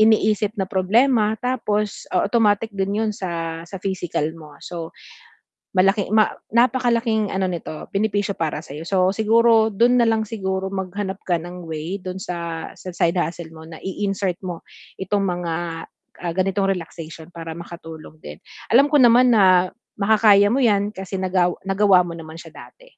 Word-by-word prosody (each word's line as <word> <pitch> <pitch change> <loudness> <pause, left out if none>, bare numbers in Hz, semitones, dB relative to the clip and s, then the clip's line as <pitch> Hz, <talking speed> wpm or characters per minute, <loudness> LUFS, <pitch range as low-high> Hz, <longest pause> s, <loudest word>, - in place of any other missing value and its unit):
iniisip 215 -1 +3
na 190 - +1
problema 215 +4 +2
tapos 215 -5 -2
o 180 - +2
automatic 220 0 +2
din 200 +2 -1
'yon 220 - 0
sa 165 -3 -4
sa 195 - -7
physical 175 -5 -2
mo. 150 -3 -13
So, 165 -2 -6 0.8
malaking 195 +2 +3
ma 215 - +4 0.2
napakalaking 235 -3 +2
ano 190 0 0
nito 165 -3 -6
benepisyo 205 0 0
para 155 -2 -2
sa'yo. 155 +2 -8
So 185 -1 +2
siguro 225 0 +4
do'n 235 +4 +3
na 235 - +4
lang 225 -1 +2
siguro 190 -3 -3
maghanap 190 +1 -4
ka 175 - +2
ng 175 +1 -9
way 160 +5 -4
do'n 185 0 -6
sa 170 -3 -5
sa 185 - -8
side 170 +1 +1
hustle 170 -1 -4
mo 160 -1 -12
na 165 - -10
i-insert 195 -1 -2
mo 175 -2 -6 0.4
itong 200 +1 0
mga, 175 -2 -2 0.7
ah, 170 - -1
ganitong 195 +1 +1
relaxation 165 -2 -9
para 165 -1 -7
makatulong 165 -2 -10
din. 75 +1 -9 0.3
Alam 275 +5 +6
ko 300 - +1
naman 245 +1 +6
na 185 -3 +5 0.3
makakaya 205 -1 +5
mo 265 +2 +2
'yan 205 -3 +2
kasi 190 0 -5
nagaw 180 -1 +1
nagawa 195 -2 +4
mo 170 - -6
naman 160 0 -10
siya - - -12
dati. - - -14
190 Hz, 160 wpm, -21 LUFS, 175-215 Hz, 0.8 s, Alam